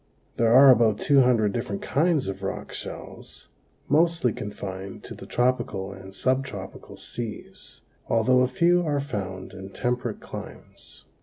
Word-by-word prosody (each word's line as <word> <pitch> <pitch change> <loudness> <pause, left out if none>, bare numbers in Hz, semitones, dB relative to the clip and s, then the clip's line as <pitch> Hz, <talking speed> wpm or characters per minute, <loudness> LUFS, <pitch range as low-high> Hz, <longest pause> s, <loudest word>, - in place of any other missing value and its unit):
There 115 -1 +3
are 135 +2 +9
about 115 -4 +4
two 140 +3 +4
hundred 115 -5 +3
different 100 +1 -3
kinds 155 - +1
of 95 0 -5
rock 95 - -5
shells, - - -9 0.4
mostly 160 -4 +3
confined 95 -2 -7
to - - -8
the - - -11
tropical 120 -6 0
and 95 0 -11
subtropical 130 -5 -3
seas, 115 -3 -8 0.3
although 125 +3 +3
a 125 - +4
few 170 +7 +3
are 145 -3 0
found 95 -9 -5
in 95 0 -9
temperate 120 +1 -2
climes. - - -10
120 Hz, 140 wpm, -25 LUFS, 100-135 Hz, 0.4 s, are